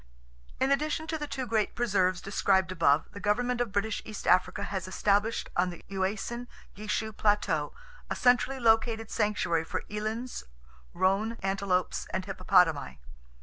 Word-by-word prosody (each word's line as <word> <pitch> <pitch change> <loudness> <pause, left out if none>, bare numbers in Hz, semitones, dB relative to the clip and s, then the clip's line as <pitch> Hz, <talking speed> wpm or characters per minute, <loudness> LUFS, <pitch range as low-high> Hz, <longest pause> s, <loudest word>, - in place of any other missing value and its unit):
In 270 - +2
addition 305 +3 0
to 320 0 -3
the 295 - -4
two 265 -2 -4
great 220 -3 0
preserves 190 -6 +1
described 190 -2 +1
above 155 -4 +3
the 200 - -9
government 245 +4 0
of 235 -4 -1
British 205 +2 -1
East 215 -2 -8
Africa 185 +2 +3
has 190 -2 -4
established 205 +4 +1
on 180 +1 +2
the 175 - -10
Uasin 205 +5 -2 0.3
Gishu 215 +1 -3
Plateau 200 -8 +1 0.4
a - - -1
centrally 250 +2 +3
located 225 -1 +2
sanctuary 205 -7 +1
for - - -4
elands, 220 +4 -4 0.5
roan 195 +4 +2
antelopes 195 -2 0
and 190 0 -2
hippopotamii. 180 - +2
205 Hz, 145 wpm, -29 LUFS, 185-230 Hz, 0.5 s, above